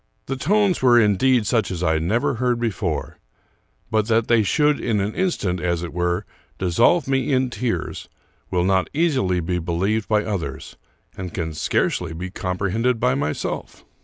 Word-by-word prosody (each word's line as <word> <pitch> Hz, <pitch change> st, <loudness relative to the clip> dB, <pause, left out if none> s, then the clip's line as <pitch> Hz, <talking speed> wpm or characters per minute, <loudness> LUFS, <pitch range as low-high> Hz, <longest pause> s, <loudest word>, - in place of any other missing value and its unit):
The 135 Hz, -, -3 dB
tones 195 Hz, +7 st, +2 dB
were 120 Hz, -2 st, +6 dB
indeed 110 Hz, +3 st, +3 dB
such 115 Hz, -1 st, +1 dB
as 90 Hz, -1 st, -4 dB
I 80 Hz, -1 st, +2 dB
never 105 Hz, +12 st, 0 dB
heard 125 Hz, 0 st, 0 dB
before; 100 Hz, -9 st, -3 dB, 0.7 s
but 110 Hz, -1 st, +1 dB
that 115 Hz, -1 st, +2 dB
they 120 Hz, -2 st, +5 dB
should 150 Hz, +7 st, +2 dB
in 110 Hz, -3 st, 0 dB
an 100 Hz, +2 st, -1 dB
instant, 105 Hz, -, -1 dB
as 85 Hz, -1 st, -1 dB
it 85 Hz, -, -6 dB
were, 90 Hz, 0 st, -1 dB, 0.3 s
dissolve 95 Hz, -, +3 dB
me 135 Hz, 0 st, 0 dB
in 130 Hz, -1 st, +1 dB
tears, 120 Hz, -1 st, -3 dB, 0.4 s
will 90 Hz, -2 st, +1 dB
not 95 Hz, 0 st, +2 dB
easily 135 Hz, -, +1 dB
be 90 Hz, +2 st, -1 dB
believed 95 Hz, +6 st, -1 dB
by 105 Hz, -1 st, +2 dB
others, 85 Hz, -11 st, -4 dB, 0.4 s
and 90 Hz, -2 st, -6 dB
can 80 Hz, -3 st, -3 dB
scarcely 80 Hz, +2 st, -1 dB
be 90 Hz, +3 st, -6 dB
comprehended 100 Hz, +7 st, -1 dB
by 125 Hz, +2 st, +2 dB
myself. 75 Hz, -, -3 dB
105 Hz, 160 wpm, -22 LUFS, 90-125 Hz, 0.7 s, were